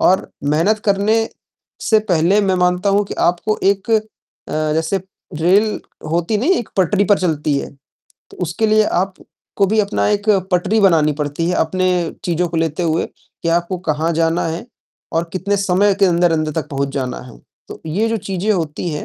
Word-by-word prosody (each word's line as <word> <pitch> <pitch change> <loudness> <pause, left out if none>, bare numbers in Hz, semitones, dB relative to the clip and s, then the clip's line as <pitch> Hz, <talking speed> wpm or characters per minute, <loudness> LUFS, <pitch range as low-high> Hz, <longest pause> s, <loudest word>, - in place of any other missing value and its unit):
और 190 - +2 0.2
मेहनत 200 +8 +2
करने 205 +2 +2 0.6
से 220 - +4
पहले 175 +5 +3
मैं 195 -2 +1
मानता 180 +2 +2
हूँ 205 +1 +2
कि - - -6
आपको 180 +5 -1
एक 195 +2 +1
अ, 220 - +4 0.7
जैसे 165 +5 0 0.4
रेल 205 +5 +3 0.3
होती 170 +6 0
नहीं, 265 - +1
एक 240 - -1
पटरी 195 +2 +2
पर 205 0 +3
चलती 150 -5 0
है - - -6 0.6
तो - - -14
उसके 175 +6 0
लिए 215 0 +4
आपको 195 +1 -2
भी 215 +3 0
अपना 200 0 0
एक 205 +1 -1 0.2
पटरी 195 +5 +2
बनानी 160 -6 +4
पड़ती 150 +3 -2
है 180 - +1
अपने 185 +3 +1 0.4
चीज़ों 175 0 0
को 165 - -4
लेते 160 +1 -1
हुए, 165 -1 +1
कि 170 - -9
आपको 175 +2 0
कहाँ 160 +3 0
जाना 165 +1 +1
है 165 +7 -5 0.5
और 165 +1 -1
कितने 200 +2 -1
समय 200 +1 +2
के - - +6
अंदर-अंदर 165 -3 +2
तक 160 0 -3
पहुँच 140 -1 -1
जाना 130 -2 -3
है। - - -13 0.3
तो - - -9
ये 205 +9 0
जो 225 - 0
चीज़ें 195 +2 -1
होती 165 -2 -2
हैं 150 - -4
180 Hz, 180 wpm, -18 LUFS, 165-200 Hz, 0.7 s, के